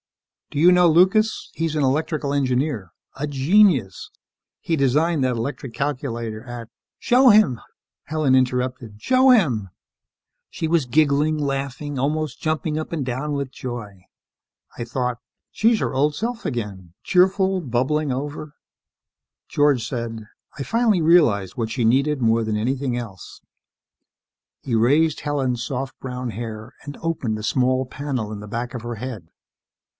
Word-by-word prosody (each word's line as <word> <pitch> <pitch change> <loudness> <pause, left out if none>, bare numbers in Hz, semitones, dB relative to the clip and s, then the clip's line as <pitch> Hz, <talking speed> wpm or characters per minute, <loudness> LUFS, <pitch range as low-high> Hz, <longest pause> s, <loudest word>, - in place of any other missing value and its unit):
Do 145 - -4
you 175 +4 +7
know 180 -1 +5
Lucas? 190 +7 +3
He's 160 -1 -2
an 150 - +1
electrical 150 +1 0
engineer... 130 - 0 0.3
a 140 - -3
genius. 145 - +2 0.5
He 165 - -1
designed 150 +2 +2
that 125 -2 0
electronic 125 0 -5
calculator 120 -6 -3
at 120 -2 -8 0.2
" - - -70
"Show 255 +1 +5
him," 205 - +4 0.4
Helen 155 -4 +1
interrupted. 125 -3 -1
"Show 260 +1 +4
him!" 130 - +3 0.8
She 160 - -3
was 160 -5 +1
giggling, 150 +2 +2
laughing, 140 0 -3
almost 150 0 -2
jumping 155 0 -1
up 155 - -6
and 155 -5 -2
down 130 +4 -3
with 140 -2 -3
joy. 115 -8 -7 0.8
I - - -3
thought: 125 0 -3 0.3
She's 225 0 +2
her - - -2
old 145 +3 +1
self 235 +4 -4
again, 100 - -5
cheerful, 190 +1 +2
bubbling 140 +2 0
over... 145 +3 -5 0.9
George 145 -6 +2
said, 115 -4 -5 0.3
"I 140 - -3
finally 225 - +2
realized 150 - +3
what 115 -2 -2
she 115 0 -1
needed 135 +4 +2
more 115 0 +2
than 110 -1 -1
anything 130 +2 -1
else 100 -8 -8 0.6
..." - - -64
He 120 - -1
raised 145 +8 +3
Helen's 130 -5 -1
soft 135 +1 -4
brown 125 -2 -5
hair 110 +2 -7
and 145 -1 -8
opened 145 -10 -2
a 105 - -7
small 130 +2 +1
panel 130 -5 -4
in 105 - -6
the 105 - -9
back 120 +1 -4
of 125 - -5
her 120 0 -5
head. 110 -7 -7
135 Hz, 150 wpm, -22 LUFS, 120-155 Hz, 0.9 s, you